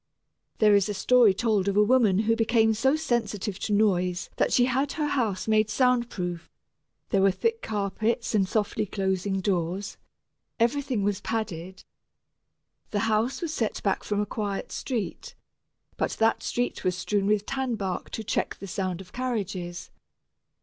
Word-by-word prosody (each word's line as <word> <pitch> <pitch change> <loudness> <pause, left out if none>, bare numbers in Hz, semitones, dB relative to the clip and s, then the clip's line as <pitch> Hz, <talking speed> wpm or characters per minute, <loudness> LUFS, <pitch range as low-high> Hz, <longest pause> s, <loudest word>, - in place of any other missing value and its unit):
There 210 -1 +5
is 200 0 +3
a 205 - -2
story 245 0 +5
told 210 -1 +1
of 200 0 +1
a 210 - +7
woman 220 -4 +4
who 225 +1 +3
became 225 -1 +3
so 265 +6 +2
sensitive 225 -9 -2
to 210 - -3
noise 185 -4 +1
that - - +2
she 245 - +4
had 265 +3 0
her 305 - -1
house 225 -10 -1
made 215 0 +3
sound 250 -1 +2
proof: 175 -2 -5 0.6
there 195 - +2
were 195 - +5
thick 455 - -1
carpets 220 +3 -1
and 195 -3 +2
softly 210 -1 0
closing 190 0 -1
doors; 185 0 -2 0.6
everything 245 -1 +1
was 200 0 0
padded. 190 -5 -4 1.1
The 205 - -1
house 225 - 0
was 325 -2 -2
set 225 -7 -2
back 195 - 0
from 205 -1 -1
a 210 - +1
quiet 205 -1 -4
street, 240 -6 -4 0.6
but - - -1
that 225 0 +2
street 245 0 -2
was 180 -1 0
strewn 200 +1 0
with 210 -1 +2
tanbark 235 -9 -3
to 220 - -5
check - - -1
the - - -9
sound 185 -1 -3
of 185 -1 -15
carriages. 195 -9 -4
210 Hz, 160 wpm, -26 LUFS, 195-235 Hz, 1.1 s, a